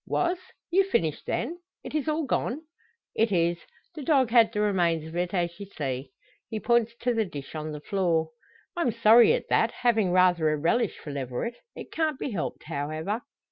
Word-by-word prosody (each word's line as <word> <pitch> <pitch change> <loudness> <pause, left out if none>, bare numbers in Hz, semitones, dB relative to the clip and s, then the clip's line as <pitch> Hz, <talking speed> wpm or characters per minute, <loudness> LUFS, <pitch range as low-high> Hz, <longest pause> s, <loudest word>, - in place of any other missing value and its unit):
"Was! 355 0 0 0.3
You've 385 +2 +4
finished 160 - 0
then. 330 +9 -2 0.2
It - - -8
is 305 -1 -1
all 310 0 0
gone?" 265 +2 -1 0.5
"It 225 -1 +1
is. 170 -1 +2 0.3
The 310 - -7
dog 265 -4 +2
had 230 -2 +6
the 210 - -3
remains 175 -6 +1
of 160 +1 -9
it, 175 0 -1
as 175 -3 0
ye 200 -1 -8
see." 135 -6 -4 0.4
He 220 - -3
points 235 0 +2
to 245 0 +1
the 225 -1 +2
dish 145 -8 -8
on 155 0 -4
the 150 -1 -7
floor. 165 -4 0 0.4
"I'm 340 -7 +1
sorry 225 +1 +6
at - - -2
that 225 - +3
having 225 -6 +1
rather 180 -3 +4
a 155 - +1
relish 170 +11 +1
for 150 - -8
leveret. 140 - -4 0.2
It - - -9
can't 310 -3 0
be 265 - -4
helped, 190 -7 -4
however." 155 +8 -3
200 Hz, 190 wpm, -27 LUFS, 160-240 Hz, 0.5 s, had